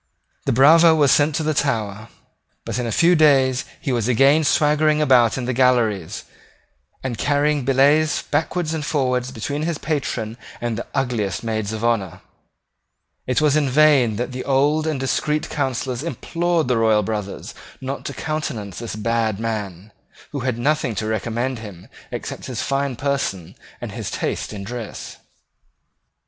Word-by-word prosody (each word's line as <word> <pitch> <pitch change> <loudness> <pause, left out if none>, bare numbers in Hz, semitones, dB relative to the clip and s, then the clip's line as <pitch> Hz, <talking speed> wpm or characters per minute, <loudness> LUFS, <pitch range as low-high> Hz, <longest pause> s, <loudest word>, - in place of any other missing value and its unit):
The - - +3
bravo 160 +6 +6
was 145 -4 +4
sent 150 0 +3
to 160 - -1
the 155 0 0
Tower: 110 -7 -1 0.6
but - - -3
in 120 - -2
a - - -2
few 170 +9 +4
days 135 -5 +4
he 145 - -3
was 120 -3 0
again 135 +5 +4
swaggering 150 +1 +3
about 130 -6 +4
the 125 -1 -2
galleries, 120 -8 +1 0.8
and 120 -4 -4
carrying 145 0 +1
billets 145 +4 +3
backward 165 0 -1
and 160 -2 -3
forward 130 -4 0
between 145 +2 -4
his 165 0 -1
patron 125 -8 -3 0.2
and 120 -1 -2
the 115 - -5
ugliest 115 -9 -1
maids 110 -2 -2
of 110 0 -5
honour. 105 -7 -1 1.1
It 125 +3 +1
was 150 -2 +3
in 145 -3 +2
vain 135 -5 +4
that 125 +3 -4
old 145 +3 +2
and 155 -4 -1
discreet 150 +4 -1
counsellors 130 -3 -2
implored 170 +1 -1
the 125 -2 +1
royal 110 -1 +3
brothers 105 -1 -5 0.3
not 135 +1 -5
to - - -4
countenance 140 - -4
this 115 -2 -5
bad 110 -1 -1
man, 105 -4 -4 0.4
who 145 - -3
had 130 -2 -2
nothing 140 -2 0
to 110 - -2
recommend 115 +3 -2
him 100 -6 -10 0.2
except - - -6
his 125 -4 -3
fine 140 -1 -1
person 125 - -2 0.3
and - - -6
his - - -5
taste - - -3
in 100 -2 -6
dress. 115 +1 -7
130 Hz, 155 wpm, -21 LUFS, 115-150 Hz, 1.1 s, bravo